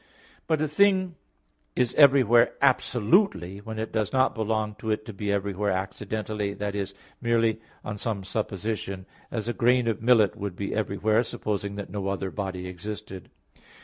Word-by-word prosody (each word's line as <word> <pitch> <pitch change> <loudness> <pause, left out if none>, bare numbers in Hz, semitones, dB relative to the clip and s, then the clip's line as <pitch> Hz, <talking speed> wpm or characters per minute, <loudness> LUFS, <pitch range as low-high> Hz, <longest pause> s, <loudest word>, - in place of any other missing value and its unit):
But 155 -1 +1
a - - +1
thing 185 +3 +3 0.6
is 125 -1 +1
everywhere 130 -5 +6
absolutely 130 - +2
when 110 +1 -7
it 110 0 -3
does 110 -3 0
not 130 0 +3
belong 110 -1 -1
to 110 - -5
it 110 0 -1
to 110 - -7
be 100 +1 -2
everywhere 100 0 -1
accidentally, 100 +2 -3
that 105 0 -3
is, 100 -1 -3 0.3
merely 115 -2 +2 0.2
on 105 0 -5
some 105 -3 -2
supposition; 100 -1 -3 0.2
as 110 -1 -3
a 120 - 0
grain 125 +1 +3
of 110 -3 -1
millet 115 -3 +4
would 100 -3 -5
be 100 +1 -3
everywhere, 110 +1 +1
supposing 100 -3 -3
that 100 -3 -6
no 100 -1 -3
other 95 -1 -2
body 95 -3 -4
existed. 95 +1 -7
105 Hz, 160 wpm, -26 LUFS, 100-115 Hz, 0.6 s, everywhere